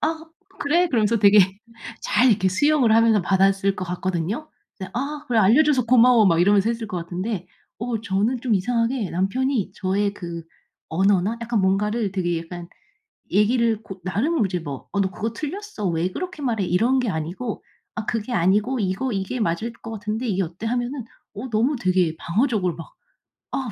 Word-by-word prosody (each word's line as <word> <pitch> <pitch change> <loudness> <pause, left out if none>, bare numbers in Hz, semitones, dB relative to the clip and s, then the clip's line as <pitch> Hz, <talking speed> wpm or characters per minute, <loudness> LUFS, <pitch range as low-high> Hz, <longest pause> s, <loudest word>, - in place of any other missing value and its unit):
"아 320 +1 -2 0.4
그래?" 340 +5 +2
그러면서 225 -4 +2
되게 205 0 +6 0.6
잘 255 +1 +3
이렇게 190 -3 +2
수용을 260 +3 +3
하면서 225 -2 +4
받았을 195 +1 +2
것 185 - -3
같거든요. 185 - -3 0.3
네 190 - -5
"아 290 +4 -3
그래 235 -2 +1
알려 225 +10 +6
줘서 270 -5 +2
고마워." 240 -2 +5
막 170 -2 +3
이러면서 200 +3 +4
했을 230 -1 -2
것 205 -4 -5
같은데 180 +2 -4 0.3
어 235 -1 -3
저는 225 +3 0
좀 245 -4 +1
이상하게 230 +2 0
남편이 205 +3 -1
저의 200 +2 -1
그 170 -3 -7 0.4
언어나 195 +4 +2
약간 235 -2 0
뭔가를 205 +2 0
되게 175 -3 -1
약간 170 +1 -8 0.6
얘기를 225 +1 +2
고 195 -3 -10
나름 220 - 0
이제 180 -2 -2
뭐 145 -5 -7
"어 200 - +1
너 190 - 0
그거 220 +4 -4
틀렸어 310 - -5
왜 170 +2 -1
그렇게 360 - -6
말해." 225 -6 0
이런 230 +10 +2
게 245 -4 0
아니고 175 +8 -4 0.3
"아 220 - -4
그게 225 +2 -3
아니고 210 +7 +2
이거 200 +7 -1
이게 195 +5 -3
맞을 220 +4 -1
거 225 - -11
같은데 215 +3 -3
이게 195 -3 0
어때?" 175 +6 -6
하면은 245 +2 -2 0.3
어 245 +6 -6
너무 235 +7 +2
되게 185 -7 +1
방어적으로 195 - 0
막 165 - -11 0.6
"어 - - -1
210 Hz, 350 characters per minute, -23 LUFS, 185-245 Hz, 0.6 s, 되게